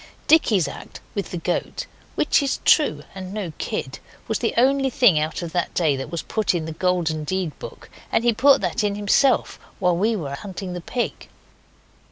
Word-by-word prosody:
Dicky's 220 Hz, -, +4 dB
act -, -, -9 dB
with 200 Hz, -, -3 dB
the 180 Hz, -, -4 dB
goat 175 Hz, +1 st, -2 dB, 0.3 s
(which -, -, +3 dB
is 275 Hz, -1 st, 0 dB
true, 155 Hz, -, +4 dB
and 185 Hz, -1 st, -7 dB
no 190 Hz, -7 st, -4 dB
kid) 130 Hz, -, -4 dB, 0.3 s
was 220 Hz, -, -1 dB
the 235 Hz, -, -1 dB
only 270 Hz, +2 st, +3 dB
thing 245 Hz, -, +4 dB
out 155 Hz, +3 st, -2 dB
of 170 Hz, -, -5 dB
that 175 Hz, +1 st, -2 dB
day 155 Hz, -5 st, +2 dB
that 135 Hz, 0 st, -5 dB
was 170 Hz, -1 st, -4 dB
put 215 Hz, -4 st, 0 dB
in 165 Hz, -2 st, -2 dB
the 160 Hz, -, -5 dB
Golden 165 Hz, -2 st, 0 dB
Deed 185 Hz, +1 st, -2 dB
book, -, -, -10 dB, 0.2 s
and 225 Hz, -, +2 dB
he 240 Hz, -1 st, +3 dB
put 275 Hz, +5 st, +5 dB
that 235 Hz, -, -1 dB
in 205 Hz, -1 st, 0 dB
himself 210 Hz, +6 st, +2 dB, 0.2 s
while 180 Hz, -2 st, +2 dB
we 215 Hz, +6 st, +1 dB
were 145 Hz, -8 st, -4 dB
hunting 185 Hz, +3 st, -6 dB
the 175 Hz, -, -5 dB
pig. 240 Hz, +7 st, -4 dB
185 Hz, 195 wpm, -23 LUFS, 165-230 Hz, 0.3 s, put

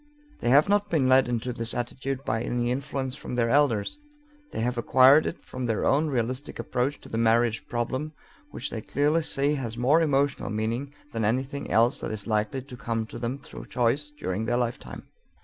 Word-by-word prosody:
They 120 Hz, -, 0 dB
have 140 Hz, +4 st, +6 dB
not 205 Hz, 0 st, +2 dB
been 150 Hz, -7 st, +2 dB
led 130 Hz, 0 st, +5 dB
into 120 Hz, +1 st, -2 dB
this 115 Hz, -1 st, -1 dB
attitude 130 Hz, +2 st, -3 dB
by 110 Hz, +1 st, 0 dB
any 120 Hz, 0 st, -1 dB
influence 135 Hz, 0 st, -3 dB
from 145 Hz, -, -6 dB
their 115 Hz, -1 st, +1 dB
elders; 140 Hz, -, +2 dB, 0.5 s
they -, -, -3 dB
have 125 Hz, +2 st, 0 dB
acquired 130 Hz, +5 st, +6 dB
it -, -, -6 dB
from 125 Hz, -1 st, -5 dB
their 110 Hz, -2 st, 0 dB
own 150 Hz, +3 st, +3 dB
realistic 130 Hz, 0 st, -2 dB
approach 130 Hz, +3 st, -1 dB
to -, -, -12 dB
the 115 Hz, -, -2 dB
marriage 115 Hz, 0 st, +2 dB
problem, 130 Hz, +5 st, -2 dB, 0.4 s
which -, -, -4 dB
they -, -, -4 dB
clearly 150 Hz, +4 st, +1 dB
see 145 Hz, -2 st, 0 dB
has 120 Hz, -5 st, -4 dB
more 140 Hz, +7 st, +4 dB
emotional 140 Hz, -2 st, +1 dB
meaning 115 Hz, +6 st, -2 dB, 0.2 s
than 115 Hz, -1 st, -1 dB
anything 130 Hz, +6 st, -1 dB
else 120 Hz, +5 st, +3 dB
that -, -, -4 dB
is 110 Hz, -2 st, -3 dB
likely 110 Hz, +4 st, -1 dB
to 130 Hz, -2 st, -10 dB
come 115 Hz, -2 st, -2 dB
to -, -, -9 dB
them 120 Hz, +3 st, -2 dB
through 140 Hz, -, -10 dB
choice 125 Hz, +4 st, +1 dB
during 105 Hz, -4 st, -2 dB
their 120 Hz, +1 st, +1 dB
lifetime. 115 Hz, -, -4 dB
125 Hz, 195 wpm, -26 LUFS, 115-140 Hz, 0.5 s, have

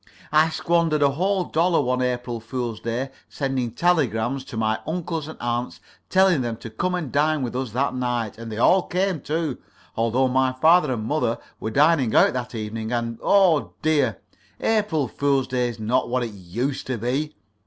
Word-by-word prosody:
I 155 Hz, +1 st, +5 dB
squandered 165 Hz, -2 st, +1 dB
a 140 Hz, -, +4 dB
whole 185 Hz, +6 st, 0 dB
dollar 170 Hz, +1 st, +2 dB
one 125 Hz, -2 st, 0 dB
April 125 Hz, -1 st, -2 dB
fool's 115 Hz, -1 st, -4 dB
day 120 Hz, +4 st, -3 dB, 0.2 s
sending 135 Hz, -4 st, -2 dB
telegrams 135 Hz, -, +1 dB
to 115 Hz, -, -8 dB
my 110 Hz, 0 st, 0 dB
uncles 165 Hz, -2 st, -3 dB
and 160 Hz, -, -9 dB
aunts, 120 Hz, +1 st, -2 dB, 0.3 s
telling 190 Hz, -6 st, +4 dB
them 115 Hz, -2 st, -3 dB
to 115 Hz, -, -9 dB
come 180 Hz, +11 st, -1 dB
and 160 Hz, -7 st, -4 dB
dine 150 Hz, 0 st, +2 dB
with 125 Hz, -1 st, -4 dB
us 130 Hz, -1 st, -2 dB
that 135 Hz, +2 st, 0 dB
night; 120 Hz, -4 st, -2 dB
and 115 Hz, -1 st, -7 dB
they 105 Hz, -, -5 dB
all 185 Hz, +11 st, +5 dB
came, 185 Hz, -3 st, 0 dB
too, 155 Hz, -2 st, -2 dB, 0.4 s
although 115 Hz, +3 st, +2 dB
my 130 Hz, 0 st, +2 dB
father 155 Hz, +3 st, +4 dB
and 110 Hz, -4 st, -2 dB
mother 125 Hz, -3 st, 0 dB, 0.2 s
were 110 Hz, -, -3 dB
dining 145 Hz, -1 st, +3 dB
out -, -, +5 dB
that 125 Hz, -1 st, -4 dB
evening, 110 Hz, +1 st, -4 dB
and 115 Hz, -1 st, -2 dB
oh 185 Hz, -7 st, +3 dB
dear, 155 Hz, -2 st, +2 dB, 0.4 s
April 205 Hz, -, +1 dB
fool's 140 Hz, +2 st, +1 dB
day 125 Hz, -1 st, 0 dB
is 115 Hz, -1 st, -8 dB
not 120 Hz, +4 st, 0 dB
what 125 Hz, 0 st, 0 dB
it 115 Hz, -, -4 dB
used 105 Hz, +8 st, -4 dB
to 130 Hz, -2 st, -2 dB
be. 135 Hz, +7 st, -2 dB
130 Hz, 185 wpm, -23 LUFS, 120-155 Hz, 0.4 s, I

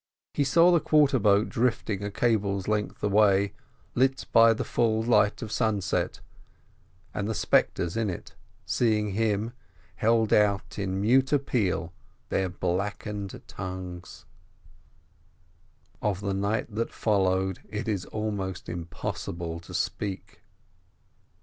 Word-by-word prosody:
He 145 Hz, -, +1 dB
saw 165 Hz, +6 st, +5 dB
the 170 Hz, -, +5 dB
quarter 145 Hz, -3 st, +3 dB
boat 105 Hz, 0 st, +4 dB
drifting 115 Hz, -4 st, 0 dB
a 100 Hz, -, -2 dB
cable's 100 Hz, -3 st, 0 dB
length 105 Hz, -1 st, -2 dB
away, 100 Hz, -1 st, +3 dB, 0.4 s
lit 135 Hz, +1 st, +1 dB
by 115 Hz, 0 st, +7 dB
the 115 Hz, -, -1 dB
full 110 Hz, -1 st, +1 dB
light 115 Hz, -1 st, +3 dB
of 110 Hz, -, -6 dB
sunset, 105 Hz, -6 st, 0 dB, 0.9 s
and 100 Hz, +1 st, -2 dB
the 110 Hz, -, -1 dB
spectres 85 Hz, -3 st, +1 dB
in 115 Hz, -2 st, 0 dB
it, 90 Hz, -, -7 dB, 0.3 s
seeing 105 Hz, -3 st, +1 dB
him, 110 Hz, +2 st, 0 dB, 0.4 s
held 110 Hz, +2 st, +2 dB
out 105 Hz, -1 st, +2 dB
in 95 Hz, -1 st, -2 dB
mute 130 Hz, +6 st, +3 dB
appeal 110 Hz, -, 0 dB, 0.4 s
their 95 Hz, -1 st, 0 dB
blackened 100 Hz, +3 st, -3 dB
tongues. 90 Hz, -1 st, -7 dB, 1.8 s
Of 100 Hz, -3 st, 0 dB
the 100 Hz, -1 st, -1 dB
night 100 Hz, +3 st, -1 dB
that 115 Hz, +2 st, -2 dB
followed 95 Hz, -3 st, +1 dB
it 110 Hz, +2 st, -4 dB
is 100 Hz, -4 st, -1 dB
almost 100 Hz, -4 st, -4 dB
impossible 85 Hz, 0 st, -5 dB
to 85 Hz, -, -12 dB
speak. 100 Hz, -1 st, -3 dB
105 Hz, 120 wpm, -27 LUFS, 95-115 Hz, 1.8 s, by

